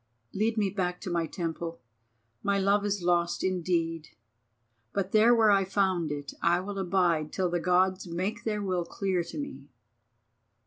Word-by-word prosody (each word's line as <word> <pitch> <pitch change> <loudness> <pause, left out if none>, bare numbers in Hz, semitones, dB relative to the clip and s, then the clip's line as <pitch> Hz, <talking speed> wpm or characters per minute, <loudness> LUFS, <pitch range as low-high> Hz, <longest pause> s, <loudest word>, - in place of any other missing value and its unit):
Lead 220 +3 0
me 200 -3 +1
back 180 -3 -2
to 185 - -4
my 170 -1 0
temple. 165 -1 -4 0.6
My 200 0 +1
Love 200 +1 +2
is 200 -3 -2
lost 175 0 +1
indeed, 165 -3 -1 0.9
but 195 -1 -1
there 225 +3 +6
where 220 -2 +5
I 195 -1 +4
found 185 -4 0
it 145 -2 -5
I 175 +1 +3
will 195 +2 -5
abide 175 -5 +1
till 185 -2 -1
the 175 - +1
Gods 185 +2 +2
make 190 +7 -3
their 210 -2 -1
will 185 -3 0
clear 185 0 -1
to 170 - -8
me." 140 - -6
185 Hz, 165 wpm, -28 LUFS, 170-200 Hz, 0.9 s, there